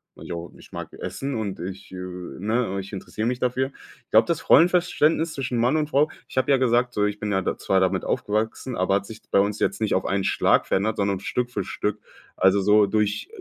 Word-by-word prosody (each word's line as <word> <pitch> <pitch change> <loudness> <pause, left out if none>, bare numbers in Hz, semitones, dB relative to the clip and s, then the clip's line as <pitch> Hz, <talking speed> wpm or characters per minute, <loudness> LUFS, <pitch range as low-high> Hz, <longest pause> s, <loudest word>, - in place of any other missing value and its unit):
Naja, 85 - -7 0.2
ich - - -16
mag - - -7
essen 135 -1 -4
und 105 -4 -3
ich 95 +2 -7
äh, 95 - -8 0.4
ne, 105 -1 0
ich 95 +2 -8
interessiere 110 +3 -4
mich 125 0 -1
dafür. 130 +1 0 0.4
Ich - - -59
glaube, 110 +1 +6
das 170 - -2
Rollenverständnis 165 -2 +4
zwischen 125 -3 -3
Mann 125 +5 +2
und 150 -1 0
Frau 150 +1 +3 0.2
ich - - -12
habe 130 - +2
ja 140 - +6
gesagt 125 -1 +2
so, 105 - +1
ich 105 0 -2
bin 105 -1 -2
ja 95 - +2
da - - -2
zwar 95 -1 +1
damit 95 - +1
aufgewachsen, 110 +4 -2
aber 95 +1 +2
hat 100 - -1
sich 110 +2 -10
bei - - +4
uns 100 +1 +1
jetzt - - 0
nicht 110 - +1
auf 95 - +1
einen 95 0 0
Schlag - - +3
verändert, 105 +3 0
sondern 100 -2 0
Stück 125 +4 -2
für 100 -5 -3
Stück. 105 0 -2 0.4
Also 95 +1 +4
so 105 +1 +5
durch 105 0 0
110 Hz, 225 wpm, -24 LUFS, 100-125 Hz, 0.4 s, glaube